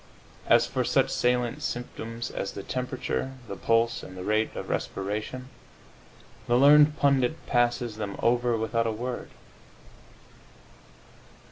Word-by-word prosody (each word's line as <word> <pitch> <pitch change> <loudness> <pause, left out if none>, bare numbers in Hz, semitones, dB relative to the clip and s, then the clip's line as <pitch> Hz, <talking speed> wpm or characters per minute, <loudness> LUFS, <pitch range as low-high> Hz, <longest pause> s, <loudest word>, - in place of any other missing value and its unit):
As - - +5
for - - -1
such - - +2
salient 125 +3 0
symptoms 120 -2 -5
as 95 - -4
the 100 - -7
temperature, 130 +2 -3
the - - -5
pulse 115 0 +1
and 95 - -10
the 90 - -6
rate 110 +2 0
of - - -5
respiration, 105 +6 -4 1.0
the 120 - +3
learned 150 +2 +6
pundit 140 +1 +1
passes 120 -2 +1
them 105 -2 -4
over 120 0 +2
without 115 +1 0
a - - 0
word. 120 +3 -5
120 Hz, 125 wpm, -27 LUFS, 110-125 Hz, 1.0 s, learned